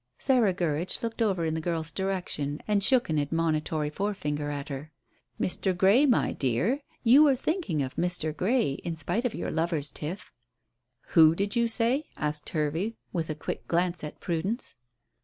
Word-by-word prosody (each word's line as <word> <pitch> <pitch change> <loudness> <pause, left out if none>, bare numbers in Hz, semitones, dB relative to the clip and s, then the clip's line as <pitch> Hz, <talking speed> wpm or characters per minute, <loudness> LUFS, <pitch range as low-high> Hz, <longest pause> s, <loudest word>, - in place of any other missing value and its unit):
Sarah 250 -7 +3
Gurridge 170 +1 -1
looked 230 0 -3
over 190 -6 +1
in 160 - 0
the 160 - -2
girl's 165 -1 -2
direction 175 -6 -2
and 205 -2 +2
shook 255 +3 +3
an 155 - +2
admonitory 155 0 -1
forefinger 150 -6 -2
at 145 0 -5
her. 145 +2 -6 0.5
"Mr. 185 0 0
Grey, 205 +11 +5
my 250 - +2
dear 165 - 0 0.2
you 255 +5 +7
were 290 -3 +6
thinking 255 - -1
of 130 - -6
Mr. 170 -3 -1
Grey, 220 - +1
in 170 - -3
spite 185 - -1
of 240 - -1
your - - -3
lover's 160 -3 0
tiff." 165 +6 -6 0.8
"Who 160 -1 +6
did 200 +5 -1
you 235 0 +3
say?" 240 +6 +1
asked 150 0 -2
Hervey, 160 +8 -1 0.2
with 165 -3 -2
a 155 - -2
quick 150 - -5
glance 175 0 0
at 150 - -7
Prudence. 190 +8 -3
175 Hz, 170 wpm, -28 LUFS, 155-220 Hz, 0.8 s, you